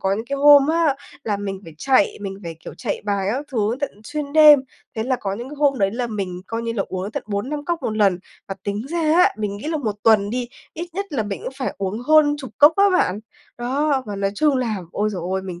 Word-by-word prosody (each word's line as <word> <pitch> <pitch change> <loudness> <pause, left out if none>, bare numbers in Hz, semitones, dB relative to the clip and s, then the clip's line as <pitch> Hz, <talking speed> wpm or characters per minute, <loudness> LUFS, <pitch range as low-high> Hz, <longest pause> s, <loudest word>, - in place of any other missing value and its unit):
có 195 0 +1
những 220 - -4
cái 280 - -2
hôm 285 0 +7
á, 320 -3 +2 0.3
là 210 -2 0
mình 195 -1 -5
phải 165 - -11
chạy, 260 -6 +2
mình 195 -1 -6
phải, 165 -2 -7
kiểu, - - -8
chạy - - -4
bài 200 -2 -1
các 270 +4 -3
thứ 220 -1 0
tận 285 - -1
xuyên 295 0 -5
đêm, 300 -2 +8 0.4
thế 220 - 0
là 255 +2 0
có 195 -1 -2
những 240 +5 -7
cái 295 - -9
hôm 280 -3 +2
đấy 195 -1 +2
là 240 +3 -2
mình 195 -5 -4
coi 230 0 -4
như 230 0 -2
là 215 -4 -1
uống 185 -1 -4
đến 205 - -6
tận - - -3
4-5 255 +9 -3
cốc 340 0 -2
1 215 - -2
lần. 200 -4 +3 0.3
Và 195 - -3
tính 205 +4 -3
ra 340 +2 -2 0.2
á, 360 +1 +5
mình 205 -2 -3
nghĩ 210 - -8
là 320 - -1
1 220 -7 -2
tuần 210 -3 +4
đi, 245 +1 -3 0.3
ít 340 +2 -5
nhất 395 +2 -3
là 270 -7 -1
mình 205 -2 -5
cũng - - -4
phải 260 - -3
uống 195 +3 -2
hơn 295 +2 +4
chục 265 -4 -8
cốc 295 +2 +8
á 400 - +5
bạn. 210 - +1 0.4
Đó, 270 +3 0
và 205 - -5
nói 195 0 0
chung 295 +2 +2
là, 235 -4 -1 0.2
ôi 210 +1 0
giời 190 -5 -5
ơi, 190 - -1
mình 180 -2 -7
230 Hz, 265 wpm, -21 LUFS, 200-290 Hz, 0.4 s, đêm